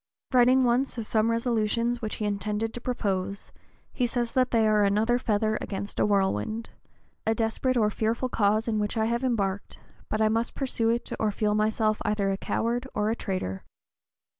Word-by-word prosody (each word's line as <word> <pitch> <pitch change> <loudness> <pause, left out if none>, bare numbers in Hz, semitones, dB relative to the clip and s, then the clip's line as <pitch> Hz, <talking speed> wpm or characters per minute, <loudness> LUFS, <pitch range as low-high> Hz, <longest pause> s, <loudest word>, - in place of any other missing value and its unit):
Writing 255 +1 +5
once 250 +2 +1
of 230 - -3
some 220 +1 +2
resolutions 230 0 0
which 215 -2 -3
he 215 - -3
intended 210 +2 -2
to 240 - -6
propose, 200 -5 -2 0.4
he 250 - +1
says 240 -1 -1
that 255 -1 +2
they 225 -2 +3
are 210 -1 +4
"another 215 +5 +2
feather 215 -2 0
against 200 0 -5
a - - +3
whirlwind. 200 - 0 0.6
A 220 - +3
desperate 230 +3 0
and 210 -2 +2
fearful 225 +3 0
cause 215 -1 +1
in 215 -2 0
which 210 +2 -2
I 220 - +2
have 235 +2 -1
embarked, 205 -6 -1 0.3
but 215 - -1
I 220 - +4
must 225 +2 0
pursue 245 -4 0
it 235 +1 -1
or 215 - +2
feel 210 0 0
myself 215 0 +1
either 210 -2 0
a 195 - -1
coward 240 +5 -1
or 210 +1 +1
a - - 0
traitor." 185 - -4
220 Hz, 185 wpm, -27 LUFS, 210-235 Hz, 0.6 s, Writing